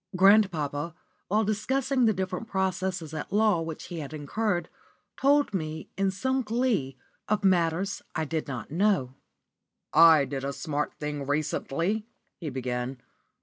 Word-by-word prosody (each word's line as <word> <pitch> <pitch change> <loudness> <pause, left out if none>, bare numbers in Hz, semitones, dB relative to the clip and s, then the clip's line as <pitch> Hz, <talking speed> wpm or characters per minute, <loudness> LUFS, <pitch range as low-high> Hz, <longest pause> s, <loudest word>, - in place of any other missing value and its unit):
Grandpapa, 170 -6 +3 0.3
while 215 +3 +2
discussing 255 +5 +1
the 220 - +4
different 190 +3 -3
processes 185 -4 -1
at 155 - -5
law 210 -4 +3
which 160 -1 -5
he 175 -2 -5
had 155 0 -6
incurred, 175 +4 -1 0.5
told 285 -2 +3
me, 160 -4 -4
in 195 0 +1
some 260 +7 0
glee, 220 - 0 0.3
of 210 -1 +1
matters 185 +1 +2
I 160 -2 0
did 160 +1 -3
not 125 -3 -6
know. 175 -7 +2 0.8
"I 160 -4 +7
did 135 0 -4
a 140 +1 -2
smart 150 -1 -3
thing 145 -2 -4
recently," 160 +8 -1 0.3
he 160 - -4
began. 125 0 -3
175 Hz, 140 wpm, -28 LUFS, 150-210 Hz, 0.8 s, I